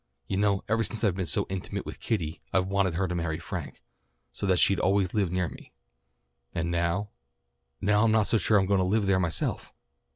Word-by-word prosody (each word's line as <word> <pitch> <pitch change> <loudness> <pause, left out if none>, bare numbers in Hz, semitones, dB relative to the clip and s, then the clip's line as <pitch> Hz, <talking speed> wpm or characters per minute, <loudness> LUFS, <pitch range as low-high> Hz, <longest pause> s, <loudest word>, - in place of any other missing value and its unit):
You 95 - -2
know 100 -1 +2
ever 115 +2 +1
since 115 0 -5
I've 100 -5 +3
been 90 -1 -3
so - - +1
intimate 95 -1 -4
with - - -7
Kitty 85 -8 -2
I've 95 -1 +2
wanted 95 -2 +1
her 95 +2 0
to 90 - -3
marry 85 -2 -1
Frank, - - -7 0.5
so 100 - -3
that 95 -1 +3
she'd 95 +4 +4
always 95 -1 +2
live 100 -5 +1
near 90 -1 0
me. - - -12 0.8
And 85 +1 -1
now 85 +4 0 0.7
now 105 +2 +3
I'm 110 - +3
not 110 -1 +3
so 115 - +2
sure 105 +3 +3
that - - +4
I'm - - -2
going 100 -1 +3
to - - +3
live 100 +3 +1
there 95 -1 +3
myself." 85 -3 -2
95 Hz, 220 wpm, -28 LUFS, 90-105 Hz, 0.8 s, she'd